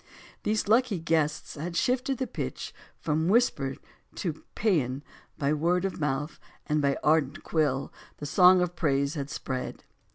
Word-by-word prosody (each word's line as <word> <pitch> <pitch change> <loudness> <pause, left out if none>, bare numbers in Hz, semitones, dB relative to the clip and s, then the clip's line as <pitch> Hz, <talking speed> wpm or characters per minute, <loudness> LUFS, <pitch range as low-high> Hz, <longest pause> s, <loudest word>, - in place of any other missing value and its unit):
These 215 -1 0
lucky 230 -1 +3
guests 160 -2 0
had 170 +4 -5
shifted 260 +4 +1
the 260 - -1
pitch 225 - -5 0.2
from 160 +1 0
whisper 180 - +2 0.4
to 160 -4 -4
paean. 145 - +1 0.3
By 140 +1 +1
word 170 +4 +1
of 190 - -3
mouth 150 +1 -2 0.3
and 150 0 +1
by 140 -1 +2
ardent 150 -2 +2
quill 140 -4 0 0.2
the 150 - -6
song 180 +4 +6
of 175 0 -1
praise 140 -3 +1
had 145 -2 -4
spread. 130 -3 -4
155 Hz, 150 wpm, -28 LUFS, 145-185 Hz, 0.4 s, song